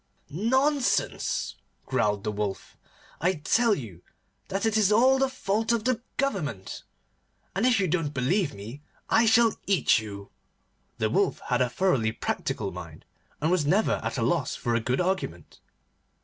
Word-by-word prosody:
'Nonsense!' 260 Hz, -, 0 dB, 0.3 s
growled 105 Hz, 0 st, 0 dB
the 105 Hz, -, -1 dB
Wolf. 105 Hz, -2 st, -4 dB, 0.4 s
'I 180 Hz, +4 st, +2 dB
tell 230 Hz, +4 st, +3 dB
you 105 Hz, -, -9 dB, 0.5 s
that 195 Hz, +2 st, -2 dB
it 220 Hz, -1 st, +1 dB
is 215 Hz, -2 st, +3 dB
all 260 Hz, +5 st, +5 dB
the 270 Hz, 0 st, +2 dB
fault 220 Hz, -2 st, -1 dB
of 230 Hz, -2 st, +1 dB
the 250 Hz, -1 st, 0 dB, 0.2 s
Government, 155 Hz, -, -2 dB, 0.7 s
and 210 Hz, +6 st, +2 dB
if 240 Hz, -4 st, +3 dB
you 190 Hz, -, +1 dB
don't 165 Hz, -3 st, 0 dB
believe 150 Hz, +6 st, 0 dB
me 110 Hz, +8 st, -9 dB, 0.3 s
I 225 Hz, +1 st, +5 dB
shall 225 Hz, 0 st, +4 dB
eat 195 Hz, -, +4 dB
you.' 100 Hz, -2 st, -9 dB, 0.7 s
The -, -, 0 dB
Wolf -, -, +1 dB
had -, -, +2 dB
a 125 Hz, -, +2 dB
thoroughly 130 Hz, -9 st, +1 dB
practical -, -, -3 dB
mind, -, -, -10 dB, 0.3 s
and 155 Hz, +3 st, 0 dB
was 170 Hz, -6 st, +1 dB
never 195 Hz, +8 st, +2 dB
at -, -, -3 dB
a -, -, 0 dB
loss -, -, 0 dB
for 120 Hz, -, -2 dB
a 115 Hz, -, +2 dB
good 125 Hz, +3 st, -1 dB
argument. 180 Hz, -, -3 dB
185 Hz, 160 wpm, -27 LUFS, -, 0.7 s, all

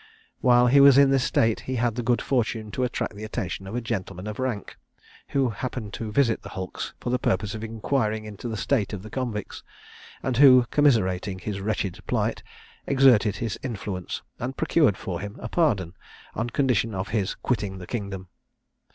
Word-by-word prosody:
While 125 Hz, -1 st, +5 dB
he 130 Hz, +3 st, +5 dB
was 140 Hz, -1 st, +8 dB
in 140 Hz, -1 st, +6 dB
this 135 Hz, -2 st, +3 dB
state, 115 Hz, -1 st, +2 dB
he 130 Hz, -, -4 dB
had 120 Hz, -1 st, +1 dB
the 120 Hz, -, -3 dB
good 120 Hz, +1 st, +1 dB
fortune 115 Hz, -4 st, -1 dB
to 130 Hz, -, -2 dB
attract 125 Hz, -4 st, -2 dB
the 105 Hz, -, -8 dB
attention 100 Hz, -3 st, -4 dB
of 95 Hz, -, -6 dB
a 120 Hz, -, -1 dB
gentleman 100 Hz, -5 st, -4 dB
of 105 Hz, +2 st, -6 dB
rank, 125 Hz, -6 st, -3 dB, 0.5 s
who 135 Hz, -3 st, +1 dB
happened 115 Hz, -2 st, -5 dB
to 110 Hz, -2 st, -5 dB
visit 115 Hz, -2 st, +2 dB
the -, -, -9 dB
hulks 95 Hz, -1 st, -6 dB
for 120 Hz, -, -3 dB
the 125 Hz, -, +1 dB
purpose 100 Hz, 0 st, 0 dB
of 110 Hz, 0 st, -6 dB
inquiring 110 Hz, -1 st, -1 dB
into 105 Hz, +2 st, -7 dB
the 110 Hz, -1 st, -3 dB
state 105 Hz, -1 st, 0 dB
of 100 Hz, -2 st, -5 dB
the 110 Hz, -, -10 dB
convicts, 120 Hz, -6 st, -4 dB, 0.6 s
and 130 Hz, -3 st, -1 dB
who, 130 Hz, -3 st, +8 dB
commiserating 100 Hz, -10 st, +2 dB
his 95 Hz, +1 st, -5 dB
wretched 100 Hz, -3 st, -2 dB
plight, -, -, 0 dB, 0.5 s
exerted 125 Hz, -7 st, +5 dB
his 115 Hz, -1 st, -3 dB
influence 105 Hz, -7 st, -5 dB, 0.2 s
and 125 Hz, +2 st, -4 dB
procured 140 Hz, -, +3 dB
for 90 Hz, -3 st, -4 dB
him 100 Hz, 0 st, -6 dB
a -, -, -5 dB
pardon, 100 Hz, -, +1 dB, 0.4 s
on 115 Hz, +2 st, -2 dB
condition 120 Hz, -5 st, +1 dB
of 95 Hz, +2 st, -3 dB
his 105 Hz, -3 st, -1 dB
quitting 105 Hz, -6 st, -2 dB
the 90 Hz, -, -8 dB
kingdom. 100 Hz, -3 st, -5 dB
110 Hz, 185 wpm, -25 LUFS, 100-125 Hz, 0.6 s, was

